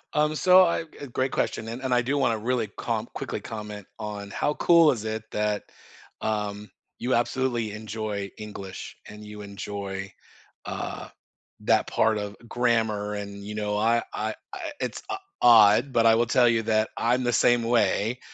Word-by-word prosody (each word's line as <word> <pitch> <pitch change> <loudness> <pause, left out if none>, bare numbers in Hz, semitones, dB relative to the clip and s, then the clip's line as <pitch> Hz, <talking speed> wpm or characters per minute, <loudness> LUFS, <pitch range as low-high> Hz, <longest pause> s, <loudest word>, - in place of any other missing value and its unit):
Um, 150 +1 +2
so, 185 +3 +7
I 170 -2 +1
g 150 -3 -11
great 130 +2 0
question, 110 - -1
and 115 +3 -6
and 130 -2 0
I 120 - +4
do 135 +4 0
wanna 115 -5 +2
really 115 +1 -1
com - - -2
quickly - - -4
comment 105 -3 -7
on 105 -2 -6
how 145 +8 0
cool 170 -3 +6
is 110 -4 -4
it 110 0 -3
that, 105 -1 -1 0.6
um, 105 -1 -2 0.3
you 125 +1 +1
absolutely 120 -2 0
enjoy 105 -1 -4
English 100 -3 -8
and 105 0 -10
you 105 0 -9
enjoy, 100 -1 -6 0.5
uh, - - -5 0.5
that - - +2
part 110 -1 +2
of 105 0 -5
grammar, 110 -4 0
and, 100 0 -6
you 105 +1 -6
know, 105 -1 -1
I 115 +2 +2
I 110 0 -2 0.2
I 345 -5 -5
it's - - -3
o 390 - -2 0.2
odd, 115 +2 +7
but 115 -2 +3
I 115 - +7
will 120 - +3
tell 120 0 +4
you 115 -1 +3
that 110 0 +1
I'm 125 +2 +1
the 120 0 +1
same 120 0 +4
way. 115 0 +1
110 Hz, 175 wpm, -26 LUFS, 105-120 Hz, 0.6 s, so